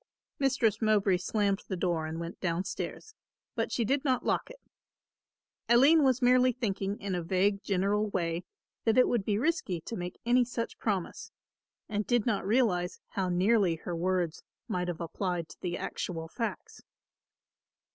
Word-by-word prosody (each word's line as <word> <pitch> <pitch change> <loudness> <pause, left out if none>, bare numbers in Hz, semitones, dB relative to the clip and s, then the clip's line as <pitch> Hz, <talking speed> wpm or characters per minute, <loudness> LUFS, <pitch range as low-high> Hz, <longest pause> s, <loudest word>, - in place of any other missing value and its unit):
Mistress 250 -6 +2
Mowbray 205 -4 +3
slammed 200 +2 0
the 190 - -3
door 170 -3 0
and 160 +1 -5
went 170 +1 -6
down 170 0 0
stairs. 435 - -6 0.4
But - - -2
she 235 - 0
did 270 +4 +1
not 260 -4 +1
lock - - 0
it. - - -12 1.1
Aline 280 +7 +6
was 260 -2 +2
merely 255 +1 +5
thinking 200 -4 -2
in 195 -1 -3
a 175 - -1
vague 195 +4 +1
general 205 +2 +1
way 170 -2 -1 0.4
that 225 0 +2
it 255 - +6
would 235 -5 +1
be 205 0 0
risky 250 - 0
to 230 - -6
make 180 -2 -6
any 245 +1 +4
such 235 -1 -4
promise 195 -6 -2 0.6
and 210 0 -2
did 240 -3 +2
not 210 -4 0
realise 200 -6 +1
how 190 -2 -1
nearly 185 0 +3
her 170 +2 -5
words 175 -1 -1 0.3
might 180 0 -1
have 175 -1 -4
applied 175 0 -2
to - - -14
the 175 -1 -2
actual 165 -3 -4
facts. 230 +7 -5
200 Hz, 165 wpm, -30 LUFS, 180-235 Hz, 1.1 s, Aline